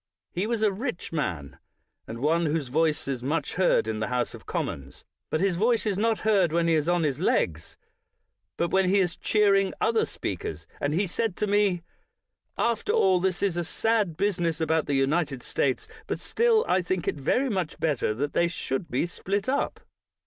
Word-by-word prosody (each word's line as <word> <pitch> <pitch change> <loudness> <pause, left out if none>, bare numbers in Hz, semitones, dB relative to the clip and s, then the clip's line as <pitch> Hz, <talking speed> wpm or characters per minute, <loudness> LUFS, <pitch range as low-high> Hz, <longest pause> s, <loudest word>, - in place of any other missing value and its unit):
He 185 +4 -2
was 230 -2 -1
a 210 - +4
rich 225 -2 -4
man, 85 - -3 0.5
and 115 +2 -7
one 165 +3 +2
whose 150 -3 -1
voice 155 +2 +1
is 135 -3 -2
much 145 +6 -1
heard 180 - +2
in 110 -1 -2
the 110 - -1
House 125 -1 -1
of - - -12
Commons; 70 +1 -4 0.2
but 155 - 0
his 190 -3 +1
voice 230 +4 +2
is 205 -3 +1
not 220 +2 +1
heard 200 -6 +3
when 170 0 +1
he 165 - +3
is 155 +1 +1
on 175 -1 +2
his 140 -4 0
legs, 80 -1 0 0.8
but 170 - 0
when 190 -1 +3
he 200 - +4
is 180 -3 +1
cheering 200 -2 +2
other 225 -1 +2
speakers; 80 -4 -5
and 145 +2 0
he 195 +4 +2
said 195 +2 -2
to - - -1
me: 200 -4 +2 0.7
"After 235 - 0
all, 190 - +4
this 185 +1 -1
is 190 -4 +1
a 175 - 0
sad 210 -2 0
business 175 -5 0
about 160 0 +1
the 145 - 0
United 135 -1 0
States; 130 -2 -1 0.2
but - - -2
still 465 -1 +2
I 185 - +3
think 180 -1 -2
it - - +2
very 245 - +1
much 185 -6 -2
better 140 -9 0
that 145 +5 -2
they 170 - +3
should 170 -2 -3
be 130 - 0
split 195 +4 -3
up. 270 - -1
175 Hz, 195 wpm, -26 LUFS, 145-200 Hz, 0.8 s, a